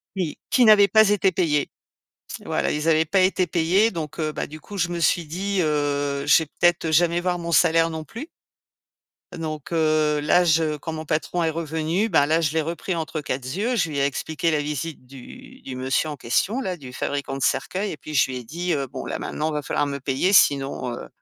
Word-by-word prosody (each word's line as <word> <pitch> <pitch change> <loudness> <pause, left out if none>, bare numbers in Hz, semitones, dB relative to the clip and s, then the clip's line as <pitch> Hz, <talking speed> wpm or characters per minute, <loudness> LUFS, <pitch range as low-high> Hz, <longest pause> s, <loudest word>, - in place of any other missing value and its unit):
Oui, 180 -6 -3
qui 250 - +4
n'avaient 210 -2 +7
pas 220 +2 +5
été 200 -2 +2
payés. 150 -6 0 0.8
Voilà, - - -1
ils 150 +2 -1
avaient 160 0 +4
pas 190 +5 +1
été 185 0 +2
payés 175 +6 +2
donc, 160 -4 -6
heu, 155 -1 -1
ben - - -4
du 155 +1 -11
coup, 205 +6 -10
je 175 -2 0
me 175 0 -4
suis 170 0 +2
dit, 190 +5 -2
heu, 145 -2 -1
je 150 +3 +5
vais - - -6
peut-être 175 +2 +1
jamais 170 +2 +3
voir 180 0 -1
mon 170 0 -5
salaire 165 0 +4
non 160 -1 -5
plus 230 - -9 1.1
donc, 155 -2 -6
heu, 155 -2 +2
là 175 +4 +4
je 160 -2 +2
quand 160 +3 -6
mon 160 0 -6
patron 160 +3 -1
est 160 - +1
revenu, 165 +5 -1
ben 160 -7 +4
là, 160 +3 +2
je 150 -3 0
l'ai 160 0 +1
repris 170 +3 -3
«entre 160 -1 -4
quatre 130 -2 -4
z 130 - -5
yeux». 235 +5 0
Je 175 -7 0
lui 145 -2 -3
ai 140 - +2
expliqué 155 +4 -2
la 155 -2 +1
visite 150 -1 -4
du 255 - -13
du 130 - -7
monsieur 130 +4 -1
en 150 - -5
question, 185 - 0
là, 185 -7 -3
du 130 -5 -10
fabricant 140 0 -3
de 135 - -3
cercueils 185 - -1
et 155 - -7
puis 155 +2 -8
je 130 - +5
lui 130 - -4
ai 125 - -7
dit, 170 +8 -3
heu, 140 -3 -2
bon 130 +1 -7
là - - -4
maintenant 155 +1 -3
va 150 -1 -2
falloir 145 - -1
me 140 -1 -4
payer 135 +8 0
sinon, 135 -7 +3
heu, - - -9
160 Hz, 230 wpm, -23 LUFS, 145-175 Hz, 1.1 s, n'avaient